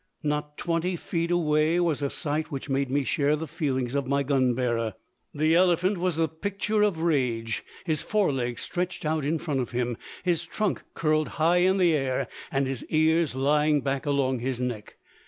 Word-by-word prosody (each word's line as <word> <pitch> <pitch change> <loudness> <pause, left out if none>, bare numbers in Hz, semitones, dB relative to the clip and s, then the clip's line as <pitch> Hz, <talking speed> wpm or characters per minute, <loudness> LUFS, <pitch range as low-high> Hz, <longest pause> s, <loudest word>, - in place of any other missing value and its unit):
Not 150 0 -2
twenty 170 +2 -1
feet 170 0 -2
away 160 -1 +2
was 165 -5 +1
a 140 - 0
sight 155 +1 -2
which 140 -1 -5
made 135 0 0
me 140 +2 +1
share 145 +2 +1
the 160 +2 -4
feelings 135 -6 -2
of 140 -2 -1
my 140 +1 +1
gun 130 -3 +2
bearer. 115 -4 -1 0.4
The 155 +2 +2
elephant 180 +2 +3
was 180 -2 0
the 165 0 +2
picture 200 +6 -1
of 200 -6 +2
rage; 125 -8 0 0.2
his 155 -4 +1
forelegs 135 - 0
stretched 180 -1 -3
out 155 -1 0
in 155 +4 +1
front 150 -4 -2
of 125 -2 -3
him, 120 -1 -1 0.3
his 175 -3 +1
trunk 215 -3 -2
curled 155 -1 +1
high 165 +2 +4
in 185 +2 +3
the 175 -3 +4
air, 135 -2 0 0.2
and 135 0 +1
his 130 -2 -3
ears 160 -2 +2
lying 150 +2 +3
back 135 +2 -2
along 135 -3 +1
his 125 +1 -2
neck. 120 -4 -4
150 Hz, 185 wpm, -26 LUFS, 135-170 Hz, 0.4 s, high